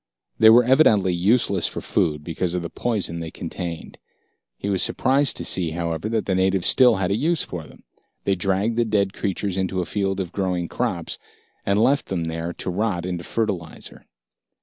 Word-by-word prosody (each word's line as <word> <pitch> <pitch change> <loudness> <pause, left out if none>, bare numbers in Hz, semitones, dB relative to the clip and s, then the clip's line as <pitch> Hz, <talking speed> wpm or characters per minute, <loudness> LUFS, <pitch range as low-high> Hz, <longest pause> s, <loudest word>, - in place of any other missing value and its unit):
They 110 - +8
were 120 +2 +7
evidently 115 - +4
useless 95 0 +2
for - - -5
food 75 -2 -1
because 85 +2 -3
of 90 - -2
the 85 - -6
poison 105 -8 -2
they 80 -1 -5
contained. 85 0 -6 0.6
He 100 - -5
was 95 -2 0
surprised 135 +1 +2
to - - -5
see, 90 -3 -1
however, 85 +3 -3
that 110 -1 -1
the 95 - 0
natives 95 0 +1
still 130 -2 +5
had 95 -1 -1
a - - +2
use 165 +7 +1
for 85 -3 -6
them. - - -17 0.4
They 100 - +1
dragged 95 +5 0
the 120 - +3
dead 100 -3 +1
creatures 100 -1 -2
into 95 0 -1
a 90 - -1
field 95 +2 -1
of 90 -3 -3
growing 90 -3 -1
crops, - - -3 0.5
and 100 +1 +2
left 135 +5 +2
them 90 -3 -2
there 80 +1 -3
to 90 - -5
rot 95 -2 -1
into 90 -2 -4
fertilizer. 100 -8 -4
95 Hz, 190 wpm, -23 LUFS, 85-110 Hz, 0.6 s, They